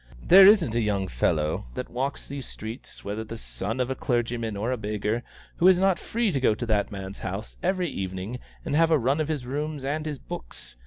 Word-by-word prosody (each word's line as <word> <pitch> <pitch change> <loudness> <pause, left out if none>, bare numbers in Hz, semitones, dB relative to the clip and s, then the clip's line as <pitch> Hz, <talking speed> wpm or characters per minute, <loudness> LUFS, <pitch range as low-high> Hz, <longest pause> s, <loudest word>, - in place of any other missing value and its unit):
There 190 +1 +9
isn't 195 - +5
a 120 - +2
young 100 -3 0
fellow 75 +1 0
that - - -5
walks 135 +3 -2
these 140 -2 -6
streets, 110 +3 -8
whether 105 +2 -3
the 115 +1 -7
son 110 +2 -4
of 130 +1 0
clergyman 120 -3 -1
or 115 +5 0
beggar, 105 +1 -2 0.4
who 175 - +5
is 185 -1 +7
not 190 0 +3
free 230 -2 0
to 140 - 0
go 110 -4 +4
to 120 - -4
that 105 -3 +1
man's 95 -1 -7
house 95 +3 -5
every 185 -1 +1
evening 95 +1 -4 0.3
and 145 -3 -1
have 165 +1 +5
the 160 - +5
run 135 +4 +1
of 155 - -1
his 150 -5 -2
rooms 145 +2 -3
and 155 +3 -2
his 150 -2 -3
books. - - -8
120 Hz, 210 wpm, -26 LUFS, 105-150 Hz, 0.4 s, There